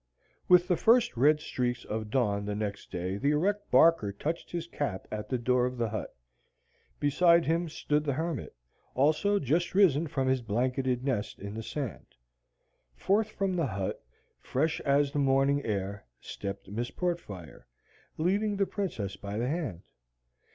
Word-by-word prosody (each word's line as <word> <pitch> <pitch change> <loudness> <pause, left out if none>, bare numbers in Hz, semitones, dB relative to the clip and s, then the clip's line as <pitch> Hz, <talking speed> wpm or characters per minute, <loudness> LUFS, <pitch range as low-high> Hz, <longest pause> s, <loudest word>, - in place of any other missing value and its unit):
With 180 0 +6
the 180 -3 +2
first 230 - +4
red 150 +5 +4
streaks 125 -4 -2
of 110 0 -4
dawn 105 -5 +1
the 105 0 -2
next 105 -1 -4
day 90 +2 -3
the 140 - +1
erect 200 +8 0
Barker 130 -6 +5
touched 155 +12 -4
his 170 -1 -3
cap 140 - -4
at 105 -1 -5
the 130 - 0
door 125 +1 +2
of 125 0 -6
the 115 -2 0
hut. - - -4 0.9
Beside 170 +4 +4
him 165 +2 0
stood 150 0 0
the 145 -2 0
hermit, 165 0 -3 0.4
also 155 +9 +3
just 170 +3 0
risen 170 -6 +4
from 135 -2 -1
his 130 -1 +2
blanketed 125 +3 0
nest 110 -7 -2
in 100 +1 -7
the 110 - -5
sand. 125 +2 -6 0.8
Forth 210 - +1
from 195 -3 -1
the 165 -4 +1
hut, 95 - -4 0.4
fresh 155 +5 -1
as 140 0 +2
the 145 - -1
morning 135 +1 +3
air, 100 - -3
stepped 100 -1 -6
Miss 115 +5 -3
Portfire, 105 - -5 0.5
leading 200 +5 +1
the 195 - +2
Princess 115 - -3
by 100 +1 -6
the 120 +2 0
hand. 140 - -3
135 Hz, 160 wpm, -29 LUFS, 110-165 Hz, 0.9 s, With